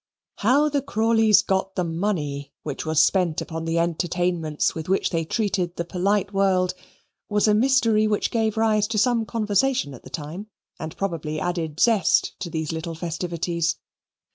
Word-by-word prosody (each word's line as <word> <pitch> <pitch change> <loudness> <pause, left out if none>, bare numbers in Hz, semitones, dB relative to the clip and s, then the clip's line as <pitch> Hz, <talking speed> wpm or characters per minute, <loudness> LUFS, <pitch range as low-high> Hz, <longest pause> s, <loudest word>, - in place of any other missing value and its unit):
How 265 +8 +3
the 290 -1 0
Crawleys 225 -4 +3
got 190 0 -1
the 180 - 0
money 165 -5 -2
which 150 +1 -5
was 160 0 +4
spent 180 -5 +1
upon 165 0 -5
the 165 +1 -1
entertainments 170 -2 0
with 160 +1 -6
which 190 - +1
they 165 -2 0
treated 185 -1 -1
the 170 - -3
polite 195 +3 0
world 185 -2 +2 0.6
was 210 +1 +2
a 210 - +4
mystery 225 -2 +3
which 210 -1 0
gave 220 -1 0
rise 215 -2 +2
to 225 0 -3
some 230 0 +2
conversation 220 - 0
at 125 - -11
the - - -13
time, 165 +7 -6 0.3
and 160 0 -7
probably 160 -5 -3
added 165 -3 -3
zest 225 -5 +3
to 175 - -4
these 160 -2 -3
little 165 +1 -5
festivities. 170 0 -2
185 Hz, 165 wpm, -24 LUFS, 165-215 Hz, 0.6 s, was